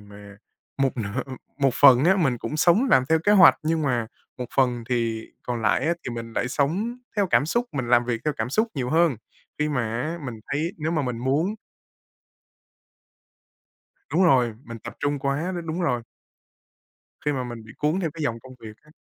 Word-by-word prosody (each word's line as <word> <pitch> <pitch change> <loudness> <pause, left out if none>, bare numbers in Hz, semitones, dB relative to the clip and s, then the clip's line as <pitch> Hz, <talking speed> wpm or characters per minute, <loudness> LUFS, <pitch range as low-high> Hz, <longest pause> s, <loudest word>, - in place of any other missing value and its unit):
mà 100 0 -13 0.5
một 135 - +1
nửa 100 -3 -3 0.4
một 135 -3 +2
phần 135 -1 +7
á 190 +3 +5
mình 135 -9 +1
cũng 135 +8 -4
sống 175 - +4
làm 130 - +5
theo 160 - +4
kế 205 - +5
hoạch, 150 -10 +7
nhưng 160 0 0
mà 125 -5 0 0.3
một 125 - -3
phần 125 -3 +2
thì 115 -2 -1 0.2
còn 120 -2 -4
lại 100 - +2
á 170 - +2
thì 120 - -4
mình 115 0 -7
lại 125 - -1
sống 180 - -1 0.2
theo 200 -2 +2
cảm 150 -4 +2
xúc, 240 +7 0
mình 130 -5 -3
làm 120 -1 +4
việc 120 -2 -2
theo 150 - +1
cảm 110 +2 -3
xúc 220 - +1
nhiều 125 -3 -2
hơn. 165 -5 +3 0.4
Khi 150 - +1
mà 135 -5 0 0.2
á, 160 +5 -3
mình 115 -4 -6
thấy 160 +5 -1
nếu 155 +1 -2
mà 155 -3 0
mình 125 -3 -3
muốn 145 - 0 2.6
Đúng 190 - +4
rồi, 125 -8 +4
mình 115 0 -8
tập - - -8
trung 145 -1 -1
quá, 140 +7 -1
đ - - -3
đúng 165 +3 -3
rồi. 125 -8 0 1.2
Khi 150 - +2
mà 130 -2 -2
mình 120 -2 -7
bị 110 - -13
cuốn 155 +5 0
theo 170 -4 -1
cái 165 - -7
dòng 115 -4 -1
công 130 +1 -14
việc 110 -1 -11
á. 150 0 -22
135 Hz, 205 wpm, -24 LUFS, 120-160 Hz, 2.6 s, phần